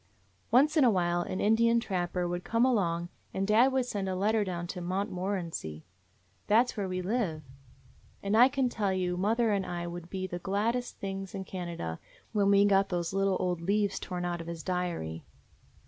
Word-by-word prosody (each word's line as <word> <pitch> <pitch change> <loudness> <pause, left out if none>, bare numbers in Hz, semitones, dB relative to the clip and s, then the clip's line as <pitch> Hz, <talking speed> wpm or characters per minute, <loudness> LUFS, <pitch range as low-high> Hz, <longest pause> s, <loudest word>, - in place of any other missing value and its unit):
"Once 285 +6 +4
in 305 - +5
a 250 - +6
while 175 -4 +1
an 185 - -4
Indian 230 +2 +4
trapper 180 -4 -2
would 175 +1 -3
come 230 +2 +2
along 175 -8 +1 0.3
and 195 - 0
dad 225 +6 +5
would 260 -1 +1
send 200 -5 -3
a 185 - -1
letter 210 +3 +2
down 175 -3 -4
to 180 +1 -6
Montmorency: 180 - -3 0.6
that 235 +4 +4
's - - -6
where 200 -3 -2
we 185 0 -2
live, 185 -7 -1 0.8
and 200 +2 +1
I 240 +3 +8
can 265 -1 +1
tell 210 -5 -1
you 180 -1 0
mother 220 +5 +2
and 200 -2 +1
I 175 -1 -4
would 175 0 -7
be 190 0 -3
the 175 -1 -5
glad 200 +5 0
dest 245 0 -4
things 195 -1 -5
in 195 - -4
Canada 170 - -5 0.3
when 200 -2 +3
we 200 0 +6
got 195 -1 +3
those 175 0 -2
little 195 -1 +2
old 180 -2 -1
leaves 200 +2 +1
torn 180 -1 -4
out 175 -1 -2
of 165 - -9
his 170 -1 -6
diary. 175 - -3
190 Hz, 195 wpm, -30 LUFS, 175-215 Hz, 0.8 s, I